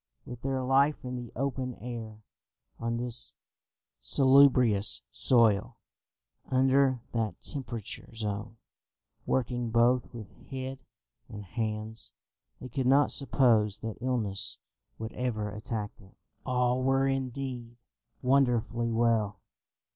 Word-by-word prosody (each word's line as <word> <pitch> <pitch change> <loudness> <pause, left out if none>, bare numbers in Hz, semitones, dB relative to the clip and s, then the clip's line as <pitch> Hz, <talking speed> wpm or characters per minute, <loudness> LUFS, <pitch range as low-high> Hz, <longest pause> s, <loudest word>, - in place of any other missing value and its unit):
With 125 -1 -9
their 135 -1 -1
life 135 +2 +2
in 125 0 -4
the 120 -2 -7
open 130 -1 -2
air, 115 -3 -8 0.6
on 115 0 -2
this 120 0 +1 0.6
salubrious 130 -6 +4
soil, 115 -3 +3 0.7
under 130 -1 +3
that 110 -3 -2
temperate 120 -7 -3 0.3
zone, 110 +1 -4 0.7
working 120 -2 0
both 120 +2 +2
with 110 -4 -12
head 130 0 -5 0.5
and 105 -1 -8
hands, 110 +2 -4 0.5
they 130 - -7
could 130 -1 -1
not 140 +3 +5
suppose 115 -7 +3
that 110 0 -6
illness 110 -6 -1 0.4
would 110 0 -6
ever 110 -5 -2
attack 105 0 -5
them. 95 -2 -19 0.3
All 125 0 +1
were 135 +1 +2
indeed 130 -3 -4 0.5
wonderfully 120 -3 +2
well. 115 -3 +1
120 Hz, 110 wpm, -29 LUFS, 110-130 Hz, 0.7 s, not